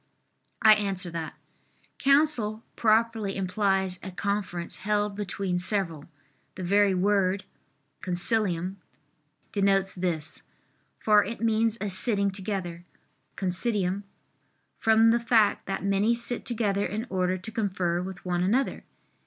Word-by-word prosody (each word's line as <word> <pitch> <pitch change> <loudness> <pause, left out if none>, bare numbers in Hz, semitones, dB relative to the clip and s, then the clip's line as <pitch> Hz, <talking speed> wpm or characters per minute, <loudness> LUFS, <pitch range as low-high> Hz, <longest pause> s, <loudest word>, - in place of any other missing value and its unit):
I 215 -1 +9
answer 195 -4 -1
that, 165 -1 -5 0.6
Counsel 275 -7 +2
properly 220 -2 +2
implies 190 -1 0
a 190 - -6
conference 190 -2 -3
held 210 0 -1
between 195 -3 -2
several; 180 -6 -1 0.5
the 185 - -6
very 200 +1 +3
word 195 0 +1 0.6
(consilium) 185 -1 -1 0.7
denotes 195 -1 +2
this, 175 -4 -3 0.6
for 210 -1 +4
it 230 +3 -6
means 225 0 +1
a 205 -1 -2
sitting 200 0 +2
together 190 -3 -4 0.5
(considium), 190 0 -1 0.7
from 225 0 +4
the 235 - +3
fact 230 -3 +2
that 195 0 -3
many 200 +4 +2
sit 235 +1 -2
together 205 -4 0
in 215 +5 -4
order 185 -1 0
to 205 +5 -9
confer 185 -6 -1
with 185 0 -8
one 175 -1 0
another. 235 +9 0
200 Hz, 120 wpm, -27 LUFS, 185-220 Hz, 0.7 s, I